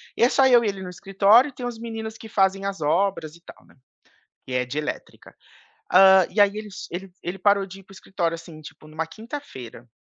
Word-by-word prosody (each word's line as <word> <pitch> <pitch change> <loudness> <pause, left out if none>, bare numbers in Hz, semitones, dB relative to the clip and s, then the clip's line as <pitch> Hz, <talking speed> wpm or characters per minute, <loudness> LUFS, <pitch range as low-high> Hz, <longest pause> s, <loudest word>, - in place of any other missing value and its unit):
E - - +1
é 240 - +6
só 265 0 +4
eu 240 -2 +5
e - - 0
ele 195 -1 -6
no 185 - -7
escritório 195 +7 +3
e - - -13
tem 250 - -7
os 240 -2 -5
meninos 225 -1 -7
que 225 - -12
fazem 195 -1 +1
as 195 -2 -4
obras 165 0 0
e 170 - -19
tal, - - -15
né. - - -23 0.7
Que 130 - -8
é 125 0 0
de 130 - -7
elétrica. 150 - -7 0.6
Hã, 190 -1 +7
e 210 - -2
aí, 205 +1 +3
eles 210 -3 -8
ele 185 +2 -7
ele 175 +2 -5
parou 200 +1 +2
de 195 +1 -11
ir - - -22
para 195 - -21
o - - -14
escritório 170 -4 -3
assim 165 -1 -12
tipo 155 0 -13
numa 155 +1 -4
quinta-feira. 215 - -10
195 Hz, 235 wpm, -23 LUFS, 165-220 Hz, 0.7 s, Hã